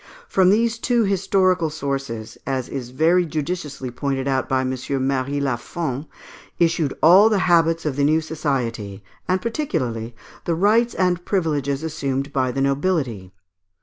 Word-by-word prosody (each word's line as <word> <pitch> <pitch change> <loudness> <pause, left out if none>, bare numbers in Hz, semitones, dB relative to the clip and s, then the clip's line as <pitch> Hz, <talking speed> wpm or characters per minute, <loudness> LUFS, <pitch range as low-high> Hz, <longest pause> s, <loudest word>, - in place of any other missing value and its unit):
From 190 - +3
these 230 +3 +2
two 240 -1 +2
historical 185 -3 +2
sources, 135 -7 -4
as 130 -2 -1
is 130 -3 -5
very 165 +7 +3
judiciously 150 -4 -4
pointed 135 +1 -2
out 130 -1 0
by 130 -1 +2
M. 130 0 -1 0.3
Mary 135 +1 -1
Lafon, 140 +2 -3 0.5
issued 165 -4 +1
all 190 +7 +8
the 215 - +2
habits 165 -2 +3
of 145 -3 -2
the 140 - +2
new 155 +3 +4
society, 125 -11 -3 0.2
and 185 +1 +1
particularly 120 - -2 0.3
the 170 - 0
rights 220 +7 +3
and 180 -2 +1
privileges 150 -7 -1
assumed 140 -3 -3
by 130 -3 +1
the 135 - -2
nobility. 135 - -1
150 Hz, 145 wpm, -22 LUFS, 130-180 Hz, 0.5 s, all